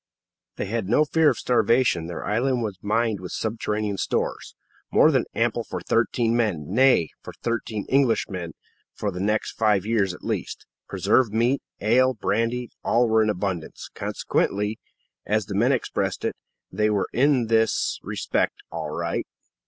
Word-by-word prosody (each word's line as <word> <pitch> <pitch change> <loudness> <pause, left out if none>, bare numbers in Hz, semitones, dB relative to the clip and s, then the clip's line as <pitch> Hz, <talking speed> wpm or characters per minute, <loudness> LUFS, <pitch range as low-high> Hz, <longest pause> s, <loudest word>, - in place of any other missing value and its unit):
They - - -3
had 105 -1 -3
no 150 +7 +4
fear 160 0 +4
of - - -1
starvation. 120 -8 +2
Their 85 - -6
island 120 +3 +1
was 100 -4 -4
mined 110 0 0
with 90 - -7
subterranean 105 -2 -2
stores, - - -2 0.4
more - - +6
than - - +2
ample - - +1
for - - -5
thirteen 115 -1 +1
men 105 -11 0
nay, 125 - +4
for - - -9
thirteen 115 -3 -2
Englishmen 110 - +1 0.4
for 105 - -2
the 90 - -6
next 105 +3 0
five 105 -3 +1
years 105 -4 +1
at - - -16
least. - - -4 0.2
Preserved 115 -5 +2
meat, 120 +4 +2 0.2
ale, 130 +4 +3
brandy 115 +4 -1
all 120 +1 +3
were 110 0 +4
in 110 - +2
abundance; 95 -4 -4
consequently, 105 +2 -1 0.5
as 105 -1 +1
the 100 - -6
men 115 +7 +3
expressed 130 - -1
it, - - -1 0.4
they 105 0 +1
were 105 -2 0
in 135 -1 +3
this 110 0 +1
respect - - -1 0.2
"all 80 -2 -4
right." 85 +2 -3
110 Hz, 155 wpm, -24 LUFS, 100-120 Hz, 0.5 s, more